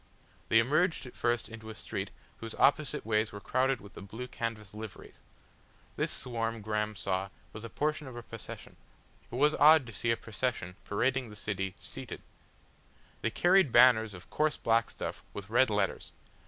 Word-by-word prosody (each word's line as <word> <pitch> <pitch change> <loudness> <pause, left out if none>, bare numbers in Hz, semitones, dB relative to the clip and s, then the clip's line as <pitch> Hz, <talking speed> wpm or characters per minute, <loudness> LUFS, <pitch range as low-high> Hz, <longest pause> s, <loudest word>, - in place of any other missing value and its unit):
They 115 - +5
emerged 155 +8 +3
at 125 - -11
first 120 -2 +1
into 110 0 -9
a 110 - -7
street - - -4 0.3
whose 115 0 -6
opposite 145 -3 +2
ways 110 0 +1
were 100 - -7
crowded 130 +5 +1
with 100 0 -13
the - - -9
blue 110 +6 -7
canvas 110 -5 -4
liveries. 110 -1 -9 0.8
This - - 0
swarm 115 -2 -2
Graham 105 0 -1
saw 95 0 -1 0.2
was 110 - -8
a 115 - -6
portion 150 +3 -1
of 130 - -8
a 120 - -7
procession - - -9 0.5
it - - -5
was 150 +4 +4
odd 155 -1 +7
to 115 - -9
see 110 +4 -2
a 115 - +3
procession 110 -5 -3
parading 130 +4 0
the 105 - -10
city 95 -2 -3
seated. - - -6 1.0
They 115 - +1
carried 175 - +4
banners 110 -4 +6
of 90 0 -13
coarse 155 0 +1
black 115 0 +2
stuff - - -6
with 100 +1 -7
red 125 +2 +5
letters. 105 -2 -1
115 Hz, 175 wpm, -31 LUFS, 105-130 Hz, 1.0 s, odd